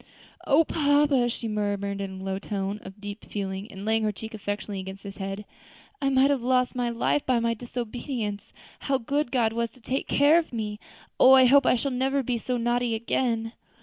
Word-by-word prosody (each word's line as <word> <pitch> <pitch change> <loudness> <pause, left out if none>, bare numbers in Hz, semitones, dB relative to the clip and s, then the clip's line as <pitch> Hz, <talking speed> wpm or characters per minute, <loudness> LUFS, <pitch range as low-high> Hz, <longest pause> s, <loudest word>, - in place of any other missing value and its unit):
"O 295 +4 +5
papa!" 285 -5 +2
she 230 0 -4
murmured, 200 -2 -2
in 190 -1 -5
a - - -8
low 190 0 -2
tone 200 0 -3
of 195 +2 -11
deep 205 +1 -7
feeling, 195 0 -4
laying 220 +3 -1
her 215 -1 +1
cheek 220 +2 -9
affectionately 205 -1 -4
against 190 +1 -8
his 200 0 -8
hand, 195 +1 -5 0.6
"I 275 - +2
might 270 +1 +4
have 275 -3 0
lost 250 0 +2
my 245 -1 0
life 235 +5 0
by 255 -2 +3
my 230 0 +1
disobedience. 235 -2 -5 0.3
How 275 -1 0
good 275 +2 -1
God 230 -4 +2
was 235 0 -1
to 255 - -19
take 260 +3 -3
care 290 +4 +5
of 330 - -5
me! 210 -3 -4 0.4
Oh! 260 - +8
I 260 -1 +8
hope 275 +1 +5
I - - +5
shall 275 +3 -1
never 265 +2 0
be 240 -1 -1
so 250 +2 -2
naughty 240 0 0
again." 230 0 -1
230 Hz, 200 wpm, -26 LUFS, 205-260 Hz, 0.6 s, Oh